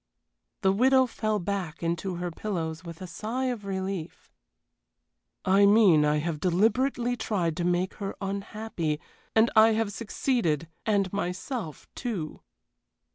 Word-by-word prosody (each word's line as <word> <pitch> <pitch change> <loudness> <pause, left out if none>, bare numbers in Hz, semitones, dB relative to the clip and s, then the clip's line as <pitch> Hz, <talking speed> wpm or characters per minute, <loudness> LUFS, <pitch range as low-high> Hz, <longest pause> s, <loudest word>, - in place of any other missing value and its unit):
The 190 -2 +4
widow 260 +5 +5
fell 215 -3 -1
back 185 -4 -3
into 170 +2 -1
her 175 0 -3
pillows 165 -4 -3
with 170 +1 -8
a - - -4
sigh 220 +8 -3
of 210 -4 -9
relief. 190 -3 -4 1.1
"I 195 +2 +5
mean 200 -8 +6
I 150 0 +3
have 155 0 -2
deliberately 235 - +2
tried 190 -8 -1
to 175 - -1
make 180 +2 +1
her 195 - -3
unhappy, 195 -5 -3 0.4
and 225 +1 +5
I 220 +1 +7
have 220 -2 0
succeeded 205 - 0 0.2
and 200 -3 +2
myself, 185 - -4
too." 200 - -4
195 Hz, 130 wpm, -27 LUFS, 170-220 Hz, 1.1 s, I